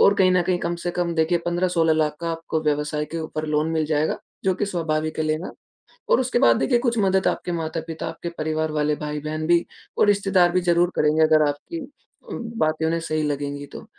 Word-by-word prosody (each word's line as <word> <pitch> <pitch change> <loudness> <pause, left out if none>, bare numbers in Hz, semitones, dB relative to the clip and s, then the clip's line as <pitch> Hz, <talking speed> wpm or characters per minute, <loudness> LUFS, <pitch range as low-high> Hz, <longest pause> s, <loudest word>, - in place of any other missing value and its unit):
और 200 - +6
कहीं 185 -2 +4
न 180 - +3
कहीं 180 0 0
कम 170 0 -2
से 175 +1 -3
कम 175 -1 -1
देखिए 160 +2 +2
15-16 175 -2 +2
लाख 155 -1 0
का 170 0 -2
आपको 165 -1 -3
व्यवसाय 150 0 0
के 165 - -5
ऊपर 155 0 -4
लोन 150 +1 +1
मिल 160 -1 0
जाएगा, 150 0 0 0.3
जो 190 -1 +2
कि 205 - -2
स्वाभाविक 155 -4 -2
है 155 - +1
लेना। 155 +3 -2 0.6
और - - +5
उसके 250 -1 +1
बाद 115 - +5
देखिए 245 -3 +2
कुछ 235 -1 0
मदद 190 -1 +2
आपके 180 - -1
माता 165 -1 -2
पिता 160 -1 -5
आपके 170 +1 -5
परिवार 155 0 -1
वाले 150 0 +1
भाई-बहन 150 +1 -4
भी, 170 0 +3 0.3
और - - +4
रिश्तेदार 195 -3 +3
भी 180 +1 +1
ज़रूर 175 0 +2
करेंगे 150 +1 +2
अगर 155 -1 +4
आपकी 145 - -4 0.5
उम, - - -4 0.2
बातें 155 +1 +1
उन्हें 165 +1 +1
सही 155 -1 -2
लगेंगी 145 -1 -3
तो। - - -10
160 Hz, 215 wpm, -23 LUFS, 155-175 Hz, 0.6 s, और